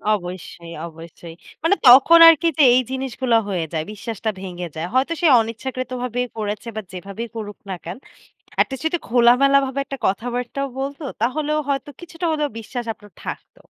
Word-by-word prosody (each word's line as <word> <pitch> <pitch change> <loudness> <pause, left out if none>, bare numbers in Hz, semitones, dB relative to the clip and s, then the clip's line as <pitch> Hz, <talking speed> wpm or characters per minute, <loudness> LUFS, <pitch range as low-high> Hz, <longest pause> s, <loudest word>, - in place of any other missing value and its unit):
অবশ্যই, 175 -2 -8
অবশ্যই। 165 0 -12 0.3
মানে 390 +5 +4
তখন 275 +7 +8
আরকি 330 0 +6
যে 300 - +6
এই 255 - +5
জিনিসগুলা 260 -2 0
হয়ে 175 -4 -1
যায়, 160 0 -2
বিশ্বাসটা 220 +1 -4
ভেঙে 180 -2 -6
যায়। 165 +2 -3
হয়তো 265 +6 +2
সে 335 - +4
অনিচ্ছাকৃতভাবেই 250 +1 -4
করেছে, 210 +2 -4
বা 215 - -3
যেভাবেই 200 +5 -7
করুক 210 -2 -6
না 185 - -2
কেন, 175 +6 -6 0.7
এট - - -5
লিস্ট 265 +4 -6
যদি 345 +2 0
খোলামেলা 250 +4 +5
ভাবে 265 +1 -5
একটা 275 -1 -7
কথাবার্তাও 245 +6 -2
বলতো, 280 +2 -5 0.2
তাহলেও 300 +5 0
হয়তো 275 +1 -2
কিছুটা 345 0 -5
হলেও 300 -1 0
বিশ্বাস 240 +2 -6
আপনার 205 -3 -18
থাকতো। - - -8
245 Hz, 160 wpm, -21 LUFS, 200-275 Hz, 0.7 s, তখন